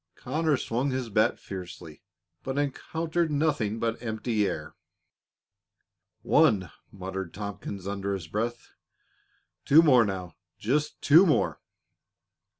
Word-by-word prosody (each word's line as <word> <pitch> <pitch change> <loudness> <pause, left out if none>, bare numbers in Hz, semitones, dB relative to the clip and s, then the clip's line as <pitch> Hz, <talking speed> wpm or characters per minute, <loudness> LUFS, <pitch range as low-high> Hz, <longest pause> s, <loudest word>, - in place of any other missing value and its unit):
Conners 150 +1 -1
swung 125 +5 0
his 130 -2 -3
bat 110 +3 +2
fiercely, 90 -4 -9 0.4
but 135 +1 -4
encountered 160 +4 -1
nothing 145 -8 0
but 115 0 -2
empty 110 -2 -1
air. 80 -3 -5 1.5
"One!" 95 -5 +3 0.2
muttered 95 -2 -6
Tompkins, 100 -1 -6
under 100 0 -2
his 90 -4 -6
breath. 115 +6 -3 0.9
"Two 160 +4 +7
more, 130 -7 +6
now 95 -4 -4 0.2
just 145 +7 -1
two 160 +5 +7
more!" 150 - +1
115 Hz, 110 wpm, -27 LUFS, 100-140 Hz, 1.5 s, Two